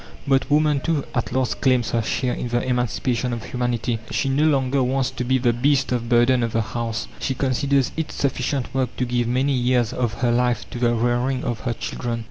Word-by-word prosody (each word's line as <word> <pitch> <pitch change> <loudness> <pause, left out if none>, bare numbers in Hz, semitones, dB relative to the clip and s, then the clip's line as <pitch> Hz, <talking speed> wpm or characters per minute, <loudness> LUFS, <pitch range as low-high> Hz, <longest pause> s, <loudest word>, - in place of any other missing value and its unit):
But 135 -1 +2
woman, 150 -1 +3
too, 155 -1 -1
at 125 - -1
last 130 0 -1
claims 125 -5 +2
her 115 - +1
share 125 +3 -1
in - - -3
the 120 0 0
emancipation 125 0 -1
of 115 -2 -5
humanity. 120 -1 -2
She 135 - 0
no 140 +3 +2
longer 135 -3 +2
wants 130 +1 0
to 130 - -4
be 130 +2 +2
the 120 -2 +2
beast 135 +3 +1
of 120 -2 -1
burden 120 +1 +4
of 115 -1 -1
the 115 - +2
house. 115 +1 -3
She 130 - -2
considers 135 +1 +1
it 160 -1 -3
sufficient 135 -1 -2
work 130 -2 -1
to 125 - 0
give 120 -1 0
many 130 +3 +1
years 125 -2 +1
of 120 -4 -1
her 120 -1 +3
life 125 0 +1
to 120 - -5
the 120 -1 +2
rearing 120 +3 0
of 120 -2 -2
her 120 - 0
children. 115 +1 -4
125 Hz, 215 wpm, -22 LUFS, 120-135 Hz, -, burden